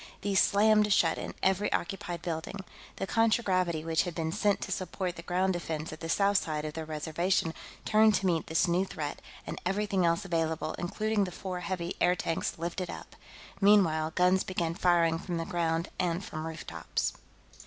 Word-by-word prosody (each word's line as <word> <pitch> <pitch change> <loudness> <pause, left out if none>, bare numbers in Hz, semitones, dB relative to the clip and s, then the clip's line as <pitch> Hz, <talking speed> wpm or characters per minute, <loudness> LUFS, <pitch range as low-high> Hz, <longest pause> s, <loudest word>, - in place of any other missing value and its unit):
These 200 -1 +3
slammed 210 +1 +4
shut 165 -4 +3
in - - -6
every 190 +2 +2
occupied 175 -3 -3
building. 170 +4 -4 0.3
The - - -3
contragravity 185 -7 +1
which 165 -1 +2
had 175 -3 -4
been 160 -1 -1
sent 205 +3 +1
to - - -4
support 185 0 -3
the 165 - -7
ground 185 +2 +1
defense 160 -2 -4
at 155 - -9
the 165 - -6
south 200 +3 +3
side 155 -1 -3
of 155 - -4
the 160 0 -5
Reservation 160 +3 0 0.3
turned 215 0 +5
to 195 - 0
meet 170 -3 +1
this 160 +3 +2
new 175 +2 +2
threat, 150 -6 -5 0.2
and - - -6
everything 195 0 0
else 170 +3 +2
available, 160 -3 -1
including 210 +3 0
the 180 - -6
four 185 0 -5
heavy 180 -1 -3
airtanks, 175 -2 +1
lifted 170 +2 -3
up. - - -9 0.5
Meanwhile, 165 -6 +4
guns 180 +1 +4
began 170 -3 -2
firing 170 -2 +3
from 175 -1 -4
the 165 - -2
ground 165 -1 -1
and 180 +1 0
from 155 0 -5
rooftops. 160 -1 -3
175 Hz, 175 wpm, -30 LUFS, 165-195 Hz, 0.5 s, turned